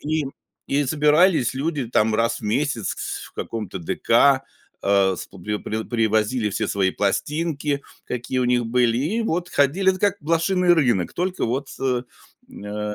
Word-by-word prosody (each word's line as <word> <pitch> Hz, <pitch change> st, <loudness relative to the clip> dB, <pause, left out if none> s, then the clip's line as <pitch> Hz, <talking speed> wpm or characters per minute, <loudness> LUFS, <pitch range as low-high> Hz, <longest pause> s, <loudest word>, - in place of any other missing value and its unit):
И 155 Hz, 0 st, -1 dB, 0.4 s
и 145 Hz, +1 st, +1 dB
собирались 150 Hz, -1 st, +3 dB
люди 140 Hz, -2 st, -2 dB
там 110 Hz, -2 st, +2 dB
раз 115 Hz, +1 st, +1 dB
в -, -, -15 dB
месяц 115 Hz, 0 st, -1 dB, 0.3 s
в -, -, -17 dB
каком-то 110 Hz, -5 st, -5 dB
ДК, 135 Hz, -, +3 dB, 0.4 s
а, 100 Hz, -1 st, +3 dB
сп -, -, -9 dB, 0.3 s
приво 110 Hz, +1 st, -3 dB
привозили 110 Hz, 0 st, +1 dB
все 100 Hz, -, -2 dB
свои 95 Hz, -2 st, +1 dB
пластинки, 145 Hz, -, -1 dB, 0.2 s
какие 125 Hz, +1 st, -3 dB
у 125 Hz, -, +2 dB
них 120 Hz, -1 st, +2 dB
были, 115 Hz, 0 st, +2 dB
и 160 Hz, -, 0 dB
вот 180 Hz, -4 st, -2 dB
ходили 175 Hz, +8 st, +3 dB
это 185 Hz, -1 st, -4 dB
как 200 Hz, -1 st, +2 dB
блошиный 170 Hz, +3 st, +2 dB
рынок, 120 Hz, -, +2 dB
только 185 Hz, +1 st, -2 dB
вот 135 Hz, +4 st, -2 dB
с, 125 Hz, -2 st, -2 dB, 0.6 s
э, 105 Hz, 0 st, -4 dB
130 Hz, 155 wpm, -23 LUFS, 110-155 Hz, 0.6 s, собирались